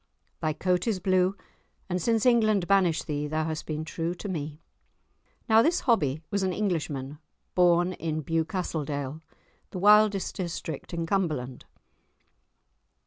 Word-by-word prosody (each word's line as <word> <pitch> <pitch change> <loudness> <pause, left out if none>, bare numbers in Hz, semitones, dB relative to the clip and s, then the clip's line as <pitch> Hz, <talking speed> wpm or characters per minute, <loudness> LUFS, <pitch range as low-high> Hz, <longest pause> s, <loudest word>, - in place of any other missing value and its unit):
Thy 155 - +1
coat 180 +5 0
is 210 -5 0
blue, 185 +1 +2 0.5
and 180 -1 -2
since 225 +4 +1
England 215 -7 +3
banished 185 -5 +3
thee 150 -1 -2
thou 155 +1 -1
hast 155 -1 -4
been 155 0 -3
true 165 +2 -3
to 205 - -7
me." 155 -5 -4 0.9
Now 220 0 +6
this 335 +7 +2
Hobbie 155 - +1
was 200 - 0
an 190 -1 0
Englishman, 150 -8 -2 0.3
born 175 0 +3
in 155 -3 -3
Bewcastledale, 155 -3 -2 0.5
the - - -7
wildest 210 0 +4
district 165 -5 -5
in 170 -1 -2
Cumberland. 155 -9 -2
175 Hz, 135 wpm, -27 LUFS, 155-195 Hz, 0.9 s, Now